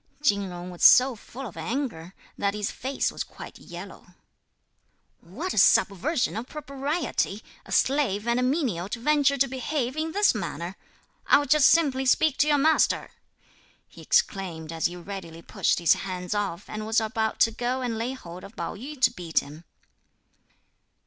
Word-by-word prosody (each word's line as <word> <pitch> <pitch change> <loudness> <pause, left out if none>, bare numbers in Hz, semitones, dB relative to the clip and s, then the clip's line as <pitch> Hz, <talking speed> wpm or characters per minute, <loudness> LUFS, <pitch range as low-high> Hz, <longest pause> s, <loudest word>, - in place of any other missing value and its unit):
Chin 200 -8 +3
Jung 175 0 -7
was 175 - -11
so 255 0 +7
full 255 +5 -10
of 210 - -9
anger 185 - -4 0.2
that 200 0 -1
his 210 -1 -2
face 265 +2 -2
was - - -4
quite - - -12
yellow. - - -11 1.0
"What 265 - -5
a - - +2
subversion 230 - +3
of 225 +3 -5
propriety! 280 - -3 0.2
a - - -11
slave 245 -7 +1
and 235 +1 +2
a - - +1
menial 250 - 0
to 230 - -4
venture 285 +1 +2
to 275 +1 +3
behave 260 0 -2
in 315 +1 -2
this 410 +4 +3
manner! 175 -3 -5 0.5
I'll 285 - +5
just 290 +1 +5
simply 270 -5 +2
speak 300 +2 +3
to 295 - +3
your 295 -1 +4
master," 310 +3 +2 0.8
he - - -15
exclaimed 180 - 0
as 165 - +1
he 175 - -8
readily 175 -2 -8
pushed - - 0
his 170 - +4
hands 180 -1 -4
off 200 -3 -3
and 215 0 -6
was 225 +1 +3
about 220 0 -2
to 225 - +5
go 245 +3 -2
and 240 -2 -2
lay 230 +4 -2
hold 180 -8 -10
of 200 - -12
Pao - - -4
yü 270 +7 -9
to 245 -2 +4
beat 175 -8 -1
him. 155 +4 -12
230 Hz, 170 wpm, -26 LUFS, 190-275 Hz, 1.0 s, so